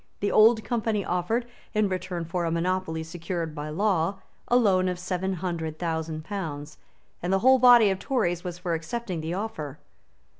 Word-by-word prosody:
The 205 - 0
Old 220 +1 +6
Company 225 -4 -1
offered, 180 +7 0 0.3
in 210 -1 +3
return 185 -2 -3
for 175 +2 -2
a 165 - 0
monopoly 170 -1 -1
secured 165 0 -4
by 150 0 -5
law, 185 +1 +1 0.3
a 245 - +2
loan 190 -6 +4
of 180 - -3
seven 180 +1 -2
hundred 165 -3 -3
thousand 160 -2 -3
pounds; 160 -7 -5 0.4
and 175 - -2
the 195 - +4
whole 260 0 +7
body 240 -4 +7
of 190 - -2
Tories 180 -9 0
was 175 -2 -5
for 180 -1 -2
accepting 175 +2 -3
the 165 +2 -3
offer. 160 -9 -5
180 Hz, 175 wpm, -26 LUFS, 165-205 Hz, 0.4 s, whole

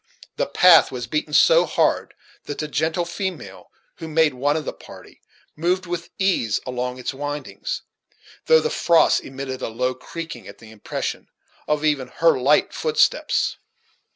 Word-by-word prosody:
The - - -1
path 180 -2 +6
was 125 -2 -5
beaten 150 +4 -3
so - - +5
hard - - 0 0.3
that 145 - -6
the 155 - -3
gentle 160 +3 -1
female, 180 0 -6 0.3
who 165 - -7
made 160 -2 +2
one 145 +4 0
of 155 - -4
the - - -4
party, - - -15 0.3
moved 180 +4 0
with 175 -1 -5
ease 185 - +1
along 125 0 -3
its 125 - -4
windings; 145 - -5 0.6
though 475 0 +6
the 465 - -2
frost 170 -1 +3
emitted 135 -1 -6
a - - -2
low 125 +3 -1
creaking 165 +6 -8
at - - -11
the 110 -1 -15
impression 110 -2 -5 0.4
of 150 0 0
even 145 -4 +1
her 165 +6 +2
light 140 +4 +3
footsteps. 465 - +1
150 Hz, 155 wpm, -22 LUFS, 130-170 Hz, 0.6 s, path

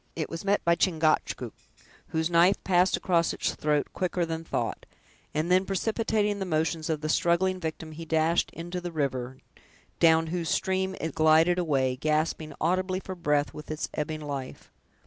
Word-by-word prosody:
It 160 -2 -3
was 165 0 -5
met 200 +1 +1
by 170 - +5
Chingachgook, 165 -2 +1 0.5
whose 160 +1 -1
knife 175 +3 +4
passed 180 0 +3
across 170 -2 +1
its - - -1
throat 150 -1 0
quicker 180 -1 -1
than 165 0 -4
thought, - - -3 0.4
and 155 +4 -1
then 185 +1 +5
precipitating 210 +1 0
the 195 - -2
motions 160 -1 -1
of 155 -2 -1
the 155 - -2
struggling 175 +4 +2
victim, 160 -1 -5
he 160 +2 -8
dashed 160 +1 +1
into 175 +2 -6
the 175 0 -5
river, 130 -4 -2 0.6
down 165 -1 +5
whose 170 -3 -2
stream 190 0 0
it 160 -2 -3
glided 160 +3 +4
away, 135 -6 +1
gasping 155 +2 -1
audibly 185 +3 0
for 190 - -7
breath 150 -5 0
with 150 - -10
its 155 0 -3
ebbing 155 +1 -3
life. 140 -3 -6
165 Hz, 165 wpm, -27 LUFS, 155-180 Hz, 0.6 s, by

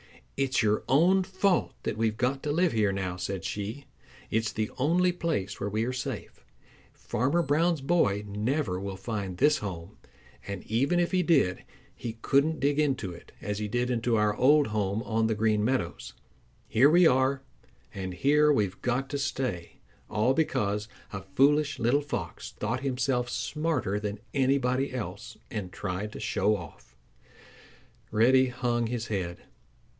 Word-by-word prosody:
"It's 135 -3 +1
your 105 0 +2
own 175 +8 +4
fault 190 0 +1
that - - -2
we've 110 -1 0
got 135 +3 0
to 150 - -2
live 175 +4 +2
here 110 -4 +2
now," 95 -2 -3
said 95 -1 -4
she. 110 +7 -4 0.5
"It's 110 0 0
the 110 -1 -2
only 175 +6 +3
place 160 - -2
where 100 - -2
we 110 +2 0
are 130 - -2
safe. 125 - -6 0.5
Farmer 140 +9 0
Brown's 160 +2 +2
boy 135 - +2
never 105 0 -1
will 95 0 -5
find 100 -3 -4
this 150 +3 +4
home, 95 -1 -7 0.5
and 100 -2 -5
even 135 +10 +1
if 175 - +1
he 185 -1 +2
did 145 - +2 0.3
he 115 -2 -6
couldn't 150 +3 +2
dig 145 +1 +1
into 135 -10 0
it 85 - -13
as 105 0 -3
he 105 - -2
did 120 +4 -1
into 120 -1 +1
our 105 -1 +2
old 145 +5 +5
home 105 0 -1
on 110 -1 +1
the 110 - 0
Green 105 0 +2
Meadows. 130 +4 -2 0.5
Here 130 +6 +5
we 175 +3 +6
are, 135 -1 +3 0.5
and 95 -2 -5
here 150 +7 +4
we've 100 -8 0
got 125 +2 0
to 140 - -2
stay, 130 -11 -3 0.4
all 110 +5 +2
because 105 -9 0 0.3
a 95 - -4
foolish 145 +8 +2
little 125 +4 +2
Fox 100 - -5
thought 115 +4 -2
himself 125 -2 -1
smarter 150 - -1
than 105 0 -4 0.2
anybody 135 0 +1
else 115 0 -6
and 100 -5 -4
tried 100 +2 -4
to - - -7
show 105 +2 +1
off." 80 -8 -12 1.1
Reddy 130 +4 +4
hung 120 -2 -1
his 115 -1 -3
head. 90 -5 -4
120 Hz, 160 wpm, -28 LUFS, 105-140 Hz, 1.1 s, we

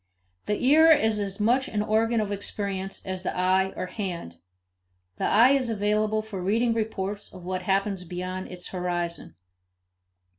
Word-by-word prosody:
The 210 - 0
ear 315 +4 +7
is 220 -9 +4
as 195 -1 -3
much 245 +6 +2
an 210 -6 -1
organ 225 +2 +2
of 210 -1 -1
experience 195 -1 -4
as 185 -1 -4
the 185 - -3
eye 190 +1 +2
or - - -3
hand; 180 - -5 0.8
the - - -1
eye 235 +5 +6
is 270 -3 +2
available 215 0 +1
for 210 -4 -6
reading 225 +5 +2
reports 210 -2 -3
of 185 -2 -12
what 185 0 -2
happens 195 0 0
beyond 180 +2 -5
its 180 -1 -7
horizon. 175 -2 -3
200 Hz, 155 wpm, -26 LUFS, 185-220 Hz, 0.8 s, ear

